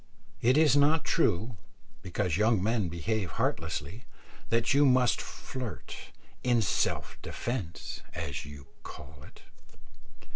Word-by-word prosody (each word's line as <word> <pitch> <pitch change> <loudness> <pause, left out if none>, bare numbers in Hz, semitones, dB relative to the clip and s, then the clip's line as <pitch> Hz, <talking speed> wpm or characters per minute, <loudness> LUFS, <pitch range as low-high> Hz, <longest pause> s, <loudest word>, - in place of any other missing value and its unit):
It 125 +4 +4
is 155 -2 +5
not 145 +2 +4
true, 110 +5 +1 0.4
because 90 -2 -1
young 105 0 +3
men 110 -4 +1
behave 90 +4 -2
heartlessly, 105 +7 -2 0.4
that 115 +3 +2
you 140 +1 +5
must 125 -3 +4
flirt 125 -4 -7 0.5
"in 120 -2 +3
self - - -1
defence," 110 -9 -4
as 75 -3 -4
you 70 -1 -11 0.2
call - - -11
it. - - -15
110 Hz, 115 wpm, -30 LUFS, 90-125 Hz, 0.5 s, is